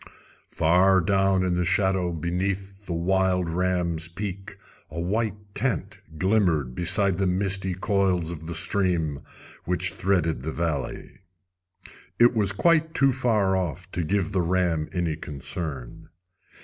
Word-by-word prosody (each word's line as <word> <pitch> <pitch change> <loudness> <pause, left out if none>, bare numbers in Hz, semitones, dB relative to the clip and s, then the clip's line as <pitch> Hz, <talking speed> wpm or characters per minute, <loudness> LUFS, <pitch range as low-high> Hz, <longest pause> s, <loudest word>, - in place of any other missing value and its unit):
Far 90 +4 +4
down 95 +1 +2
in 90 - +1
the 90 - +1
shadow 95 0 +1
beneath 95 +4 -3
the 90 - -2
wild 90 +1 +1
ram's 85 -1 -1
peak 95 +2 -6 0.3
a 85 - -6
white 105 +4 -1 0.2
tent 125 +3 -2 0.2
glimmered 85 - +2
beside 95 - +1
the 95 - +2
misty 95 0 0
coils 95 -3 0
of 80 -1 -8
the 85 - -4
stream 85 -5 0 0.5
which - - 0
threaded 85 -6 0
the 75 - -4
valley. 80 -5 -3 1.0
It 120 +1 +6
was 105 -4 +2
quite 160 - +2
too 135 0 +4
far 110 -7 +1
off 90 0 -3
to 85 - -2
give 95 +3 0
the 95 -3 +1
ram 85 -3 0
any 85 -4 -1
concern. 70 -3 -5
90 Hz, 135 wpm, -25 LUFS, 85-100 Hz, 1.0 s, It